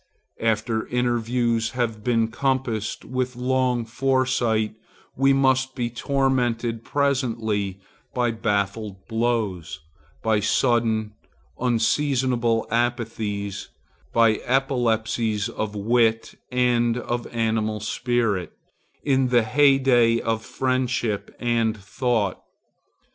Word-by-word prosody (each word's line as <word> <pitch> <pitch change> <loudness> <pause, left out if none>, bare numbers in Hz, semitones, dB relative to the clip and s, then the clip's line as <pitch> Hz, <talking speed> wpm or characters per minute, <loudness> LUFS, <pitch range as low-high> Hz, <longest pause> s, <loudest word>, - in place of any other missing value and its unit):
After 110 0 0
interviews 120 -1 0
have 115 -4 -2
been 115 -2 +1
compassed 120 -3 -1
with 130 0 -2
long 125 -1 0
foresight 120 -3 +1 0.4
we 135 +1 +3
must 130 -1 +2
be 120 -2 -2
tormented 120 -3 0
presently 115 -9 -1 0.3
by 120 -1 +1
baffled 105 -2 -2
blows, 110 -9 -1 0.4
by 110 -2 +2
sudden, 110 0 +1 0.5
unseasonable 120 -1 +1
apathies, 110 -4 -2 0.4
by 115 -2 +4
epilepsies 115 -4 0
of 110 -2 -4
wit 115 +1 +1 0.2
and 120 -1 +2
of 120 0 -3
animal 110 -2 -1
spirits, 115 -3 -1 0.5
in 135 -2 +2
the 120 -2 +3
heyday 125 -2 +4
of 115 -1 -2
friendship 125 -5 -1
and 115 -2 +1
thought. 105 0 -1
115 Hz, 90 wpm, -24 LUFS, 110-125 Hz, 0.5 s, by